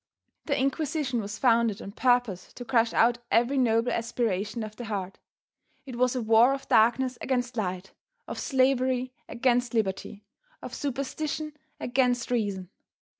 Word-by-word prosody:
The 280 Hz, -3 st, +1 dB
Inquisition 275 Hz, -2 st, -1 dB
was 205 Hz, 0 st, -6 dB
founded 230 Hz, -4 st, +2 dB
on 195 Hz, -, -8 dB
purpose 245 Hz, -5 st, +1 dB
to 245 Hz, -, -8 dB
crush 235 Hz, -2 st, +2 dB
out 240 Hz, +1 st, +3 dB
every 245 Hz, +4 st, +2 dB
noble 235 Hz, -1 st, +2 dB
aspiration 225 Hz, -2 st, -2 dB
of 215 Hz, 0 st, -8 dB
the 240 Hz, -, -7 dB
heart. 195 Hz, -3 st, -4 dB, 0.7 s
It 260 Hz, -3 st, -7 dB
was 250 Hz, +1 st, +1 dB
a 250 Hz, -, -1 dB
war 230 Hz, +4 st, +5 dB
of 270 Hz, -, -10 dB
darkness 240 Hz, +3 st, +3 dB
against 245 Hz, -2 st, -1 dB
light, 185 Hz, -3 st, -3 dB, 0.4 s
of -, -, -5 dB
slavery 255 Hz, -2 st, +1 dB, 0.2 s
against 245 Hz, -1 st, +1 dB
liberty, 200 Hz, -1 st, -2 dB, 0.4 s
of -, -, -9 dB
superstition 290 Hz, +3 st, -3 dB, 0.3 s
against 245 Hz, 0 st, 0 dB
reason. 200 Hz, -6 st, -2 dB
240 Hz, 140 wpm, -27 LUFS, 220-260 Hz, 0.7 s, war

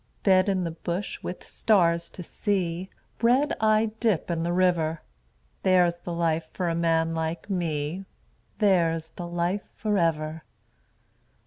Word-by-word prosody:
Bed 190 Hz, 0 st, +4 dB
in 190 Hz, -2 st, +1 dB
the 165 Hz, -, -2 dB
bush 175 Hz, +4 st, -4 dB
with 180 Hz, -, -6 dB
stars 170 Hz, -5 st, +2 dB
to 180 Hz, -, -9 dB
see, 185 Hz, -2 st, -2 dB, 0.3 s
Bread 255 Hz, +6 st, +3 dB
I 215 Hz, 0 st, +3 dB
dip 215 Hz, -7 st, +1 dB
in 165 Hz, -1 st, -1 dB
the 170 Hz, +1 st, -1 dB
river 175 Hz, -3 st, +1 dB, 0.6 s
There's 180 Hz, -2 st, +3 dB
the 175 Hz, -, -6 dB
life 165 Hz, -1 st, 0 dB
for 180 Hz, -2 st, -1 dB
a -, -, 0 dB
man 165 Hz, -1 st, +1 dB
like 160 Hz, +4 st, -3 dB
me, 165 Hz, 0 st, -2 dB, 0.5 s
There's 165 Hz, -6 st, +2 dB
the 175 Hz, +1 st, -7 dB
life 175 Hz, +3 st, -1 dB
for 210 Hz, -2 st, 0 dB
ever. 155 Hz, -1 st, 0 dB
175 Hz, 140 wpm, -26 LUFS, 165-195 Hz, 0.6 s, Bed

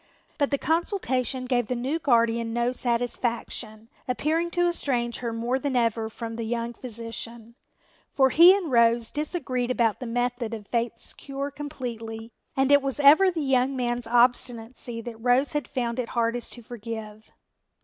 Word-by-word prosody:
But 285 Hz, -, +2 dB
the 280 Hz, -, +1 dB
consultation 270 Hz, -, -1 dB
gave 245 Hz, -3 st, 0 dB
the 250 Hz, -, -1 dB
new 265 Hz, +7 st, -2 dB
guardian 230 Hz, -4 st, +2 dB
no 240 Hz, +1 st, +1 dB
satisfaction, 235 Hz, -2 st, -2 dB, 0.2 s
appearing 315 Hz, +7 st, 0 dB
to 350 Hz, +1 st, +1 dB
estrange 245 Hz, -8 st, -1 dB
her 235 Hz, -2 st, -3 dB
more 235 Hz, +3 st, -1 dB
than 270 Hz, -1 st, -2 dB
ever 230 Hz, -2 st, +1 dB
from 225 Hz, 0 st, -6 dB
the 230 Hz, -, -3 dB
young 235 Hz, +1 st, -2 dB
physician. 230 Hz, -1 st, -7 dB, 0.6 s
For 265 Hz, -2 st, +3 dB
he 340 Hz, +3 st, +9 dB
and 350 Hz, -8 st, -4 dB
Rose 235 Hz, -1 st, +3 dB
disagreed 275 Hz, -5 st, -2 dB
about 235 Hz, -4 st, +1 dB
the 250 Hz, -, -5 dB
method 245 Hz, -1 st, -1 dB
of 210 Hz, -2 st, -10 dB
Faith's 235 Hz, +1 st, -2 dB
cure 275 Hz, +1 st, -5 dB
completely 235 Hz, -6 st, -6 dB, 0.3 s
and 270 Hz, +1 st, +3 dB
it 285 Hz, 0 st, +7 dB
was 275 Hz, 0 st, -2 dB
ever 305 Hz, +7 st, +7 dB
the 335 Hz, -4 st, -2 dB
young 265 Hz, 0 st, +2 dB
man's 240 Hz, -1 st, -2 dB
obstinacy 240 Hz, 0 st, +1 dB
that 230 Hz, -1 st, -8 dB
Rose 250 Hz, +4 st, +3 dB
had 295 Hz, -4 st, -2 dB
found 240 Hz, -2 st, -2 dB
it 240 Hz, -, -2 dB
hardest 235 Hz, 0 st, -1 dB
to 240 Hz, -, -11 dB
forgive. 220 Hz, -2 st, -8 dB
245 Hz, 160 wpm, -26 LUFS, 230-270 Hz, 0.6 s, he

